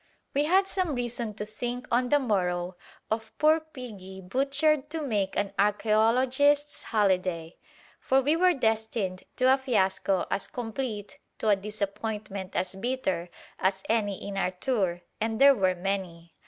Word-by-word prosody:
We 285 +2 +2
had 380 +4 +4
some 365 -7 -1
reason 240 -3 -3
to 210 - -4
think 245 +3 -5
on 245 +1 +2
the 290 - +5
morrow 180 -8 0 0.4
of 220 0 -3
poor 310 +1 +5
piggy 230 -12 -10
"butchered 275 +8 +1
to 325 +1 -2
make 210 -10 -1
an 205 -1 0
archæologists' 245 +8 +3
holiday," 185 -6 0 0.4
for 265 - +3
we 290 +4 +2
were 360 +1 +4
destined 220 -6 -1
to 255 +1 +5
a 270 - +1
fiasco 195 -6 +1
as 195 - -1
complete, 225 -3 -5 0.2
to 220 - 0
a 205 - +6
disappointment 205 -1 -4
as 185 0 0
bitter, 190 -5 -2 0.3
as 190 0 0
any 205 -4 0
in 200 -1 -5
our 195 - +1
tour, 185 -3 -1 0.2
and 220 0 -1
there 280 +1 +8
were 190 -6 +1
many. 175 -3 -4
220 Hz, 150 wpm, -28 LUFS, 195-260 Hz, 0.4 s, there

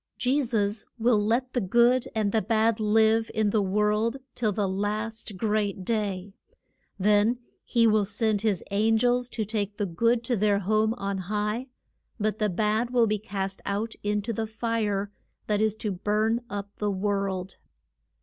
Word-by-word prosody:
Je 265 +4 +2
sus 215 -4 -1
will 225 -2 +3
let 240 +4 0
the 245 - +1
good 235 +5 +3
and 215 -2 +1
the 220 - +2
bad 225 0 +2
live 220 +1 +3
in 215 -1 +2
the 215 - +2
world 210 +5 +1 0.2
till 220 -3 0
the 205 0 0
last 210 +2 -2
great 205 -3 -1
day. 200 -3 -2 0.6
Then 210 +4 +3 0.3
he 235 -2 +2
will 215 -2 +4
send 215 0 0
his 210 -5 0
an 220 +3 +3
gels 245 +1 +1
to 220 -3 -3
take 205 -1 -3
the 205 - 0
good 230 +7 +1
to 240 +1 0
their 205 -1 +2
home 215 +3 +1
on 200 -4 -3
high, 210 +6 -2 0.5
but 215 +1 -1
the 210 -1 +2
bad 215 +5 0
will 245 -2 +3
be 215 -1 0
cast 195 -1 -4
out 210 +3 -2
in 205 0 -1
to 230 +2 -3
the 220 +1 -2
fire 215 -3 -1 0.3
that 210 -1 0
is 215 -1 +2
to 215 -1 -3
burn 215 +5 0
up 200 0 -5
the 210 - 0
world. 195 -1 -2
215 Hz, 170 wpm, -27 LUFS, 205-225 Hz, 0.6 s, will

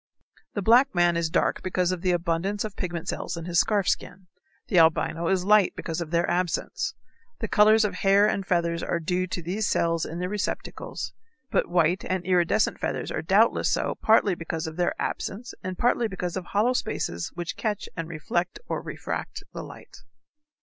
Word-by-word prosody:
The 205 - -1
black 245 +3 +5
man 175 -1 +4
is 170 -1 0
dark - - +1
because 185 -1 0
of 180 -2 -3
the 185 - 0
abundance 175 +3 0
of 215 -2 -6
pigment 175 -3 -4
cells - - -3
in 165 - -6
his 175 -1 +2
scarf 205 -4 +2
skin. 180 +1 -2 0.4
The 180 - +4
albino 165 +1 +3
is 185 0 +1
light 210 -1 +4
because 165 +1 -4
of 165 - -4
their 170 +1 +1
absence. 175 -1 -1 0.4
The - - -3
colors 215 +1 +5
of 205 - -1
hair 200 +1 +4
and 200 -2 0
feathers 170 -2 0
are 170 - -1
due 180 +3 -1
to 180 -1 -4
these 200 +6 -1
cells 165 -1 +1
in 165 - -5
their 180 +1 -2
receptacles, 205 +1 -4 0.4
but - - +1
white 175 +1 +2
and 185 -1 -2
iridescent 180 +3 +2
feathers - - -2
are - - -2
doubtless - - +3
so - - 0
partly 215 -3 +4
because 165 -2 -4
of 160 0 -6
their 175 0 0
absence 230 +6 -4
and 185 -1 -4
partly 240 -1 +2
because 180 -4 -4
of 185 -2 -4
hollow 215 +7 +2
spaces 85 - -2
which 175 -1 -4
catch 210 -3 -2
and 165 -1 -4
reflect 175 +2 -2
or - - -2
refract - - -5
the - - -5
light. - - -12
180 Hz, 190 wpm, -26 LUFS, 170-200 Hz, 0.4 s, black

